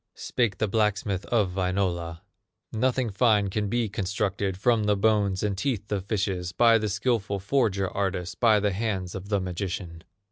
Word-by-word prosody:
Spake 115 Hz, -6 st, -1 dB
the 110 Hz, -, 0 dB
blacksmith 100 Hz, -2 st, 0 dB
of 105 Hz, -6 st, +1 dB
Wainola: 90 Hz, -3 st, -1 dB, 0.5 s
"Nothing 125 Hz, +1 st, 0 dB
fine 105 Hz, -2 st, +2 dB
can 105 Hz, 0 st, -1 dB
be 120 Hz, +1 st, 0 dB
constructed 100 Hz, -1 st, -2 dB
From 110 Hz, +1 st, +2 dB
the 105 Hz, 0 st, +3 dB
bones 100 Hz, -2 st, +2 dB
and 105 Hz, -2 st, 0 dB
teeth 105 Hz, -2 st, -2 dB
of 100 Hz, -2 st, -1 dB
fishes 95 Hz, -4 st, -1 dB
By 115 Hz, +2 st, +5 dB
the 105 Hz, 0 st, -2 dB
skillful 105 Hz, -1 st, 0 dB
forger 100 Hz, -2 st, +1 dB
artist, 95 Hz, -2 st, -3 dB
By 110 Hz, -3 st, +5 dB
the 105 Hz, 0 st, +1 dB
hands 95 Hz, -3 st, -2 dB
of 95 Hz, +1 st, -7 dB
the 100 Hz, -2 st, +2 dB
magician." 90 Hz, -2 st, -5 dB
100 Hz, 165 wpm, -26 LUFS, 95-110 Hz, 0.5 s, By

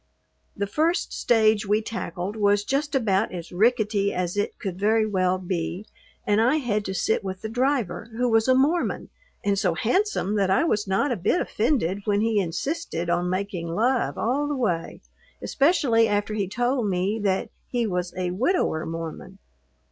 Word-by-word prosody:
The 200 Hz, -, 0 dB
first 320 Hz, -, 0 dB
stage 220 Hz, -2 st, +2 dB
we 210 Hz, +2 st, +3 dB
tackled 190 Hz, -3 st, -4 dB
was 205 Hz, -1 st, +2 dB
just 280 Hz, +4 st, -1 dB
about 215 Hz, -5 st, +1 dB
as 175 Hz, -2 st, -7 dB
rickety 210 Hz, 0 st, +2 dB
as 180 Hz, 0 st, -2 dB
it 205 Hz, 0 st, -2 dB
could 185 Hz, -2 st, -5 dB
very 215 Hz, +2 st, +3 dB
well 185 Hz, -3 st, +1 dB
be 180 Hz, +1 st, -3 dB, 0.4 s
and 210 Hz, +1 st, +3 dB
I 250 Hz, +6 st, +3 dB
had 230 Hz, -8 st, 0 dB
to 190 Hz, -, -3 dB
sit 200 Hz, +4 st, 0 dB
with 190 Hz, +1 st, -6 dB
the 220 Hz, -, -3 dB
driver, 245 Hz, -5 st, -1 dB
who 250 Hz, +1 st, +1 dB
was 225 Hz, 0 st, +3 dB
a 260 Hz, -, +5 dB
Mormon 300 Hz, +7 st, +1 dB, 0.3 s
and 200 Hz, -1 st, +1 dB
so 180 Hz, -5 st, +1 dB
handsome 240 Hz, -, 0 dB
that 195 Hz, -2 st, +2 dB
I 190 Hz, -, +3 dB
was 210 Hz, -11 st, 0 dB
not 195 Hz, +9 st, +1 dB
a -, -, +1 dB
bit 205 Hz, -, +1 dB
offended 210 Hz, -, 0 dB
when 205 Hz, -1 st, +1 dB
he 220 Hz, -1 st, +2 dB
insisted 180 Hz, -, -2 dB
on 175 Hz, +1 st, 0 dB
making 185 Hz, -2 st, -3 dB
love 235 Hz, +9 st, 0 dB
all 275 Hz, +6 st, 0 dB
the 290 Hz, -, -1 dB
way, 175 Hz, -9 st, -2 dB, 0.4 s
especially 270 Hz, -7 st, +3 dB
after 205 Hz, 0 st, -1 dB
he 205 Hz, -3 st, -1 dB
told 245 Hz, +2 st, 0 dB
me 190 Hz, +4 st, 0 dB
that 195 Hz, -2 st, -1 dB, 0.2 s
he 240 Hz, -2 st, -1 dB
was 180 Hz, -3 st, -2 dB
a 180 Hz, -1 st, -1 dB
widower 215 Hz, -, 0 dB
Mormon. 165 Hz, 0 st, -6 dB
210 Hz, 175 wpm, -25 LUFS, 185-245 Hz, 0.4 s, a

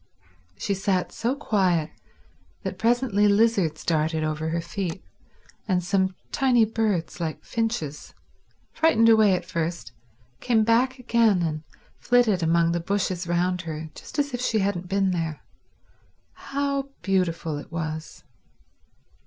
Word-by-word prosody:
She 200 Hz, -, -1 dB
sat 190 Hz, -1 st, 0 dB
so 240 Hz, +4 st, -1 dB
quiet 185 Hz, -, +1 dB, 0.7 s
that -, -, -5 dB
presently 230 Hz, -3 st, +2 dB
lizards 200 Hz, -7 st, +2 dB
darted 160 Hz, -1 st, +1 dB
over 155 Hz, +1 st, -2 dB
her 170 Hz, +1 st, -1 dB
feet, 180 Hz, +1 st, -4 dB, 0.6 s
and 180 Hz, -3 st, +1 dB
some 190 Hz, 0 st, +1 dB, 0.2 s
tiny 245 Hz, -4 st, +3 dB
birds 215 Hz, -7 st, -1 dB
like 160 Hz, -2 st, -4 dB
finches, 220 Hz, -11 st, -3 dB, 0.6 s
frightened 270 Hz, -9 st, +4 dB
away 215 Hz, -4 st, +6 dB
at 180 Hz, -1 st, -4 dB
first, 165 Hz, -6 st, -3 dB, 0.5 s
came 230 Hz, -3 st, +2 dB
back 245 Hz, +4 st, +2 dB
again 230 Hz, -6 st, +2 dB
and 155 Hz, -2 st, -2 dB, 0.4 s
flitted 240 Hz, -7 st, +3 dB
among 165 Hz, +1 st, +3 dB
the 170 Hz, -, 0 dB
bushes 185 Hz, 0 st, -1 dB
round 175 Hz, +1 st, 0 dB
her 160 Hz, -2 st, -6 dB
just -, -, -11 dB
as 285 Hz, -2 st, 0 dB
if 245 Hz, -, -3 dB
she 230 Hz, -3 st, +1 dB
hadn't 190 Hz, -3 st, -1 dB
been 195 Hz, -1 st, +2 dB
there. 165 Hz, -4 st, -3 dB, 0.9 s
How 280 Hz, 0 st, -2 dB
beautiful 170 Hz, -5 st, 0 dB
it -, -, -12 dB
was. 160 Hz, -1 st, -5 dB
190 Hz, 130 wpm, -25 LUFS, 165-225 Hz, 0.9 s, away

